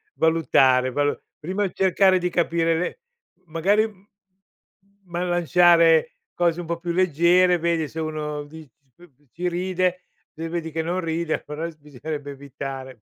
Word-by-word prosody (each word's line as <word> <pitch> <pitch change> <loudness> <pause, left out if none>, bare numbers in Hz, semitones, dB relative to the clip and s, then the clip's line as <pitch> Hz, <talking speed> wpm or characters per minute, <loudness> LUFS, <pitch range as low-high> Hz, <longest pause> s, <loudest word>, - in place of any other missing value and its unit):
valutare, 135 -6 +3
valu 145 +2 0 0.2
prima 190 +5 -2
cercare 190 0 +3
di 180 0 -1
capire 165 -1 +1
be 180 - -3 0.5
magari, 200 +5 0 1.0
ma 175 0 -4
lanciare 175 -2 +4 0.2
cose 175 -1 +1
un 175 - -8
po' 170 - -2
più 170 +1 -4
leggere, 180 +1 +3
vedi 165 -2 0
se 160 - -8
uno 150 -2 -4
di 155 0 -12 0.3
c 175 0 -18 0.2
ci 180 +2 -3
ride, 180 0 -1 0.3
se 165 +1 -6
vedi 165 -1 -4
che 160 +1 -2
non 175 +3 -2
ride, 165 0 -2
però 150 +3 -5
bisognerebbe 145 0 -7
evitare. 135 -3 -8
165 Hz, 140 wpm, -23 LUFS, 155-180 Hz, 1.0 s, lanciare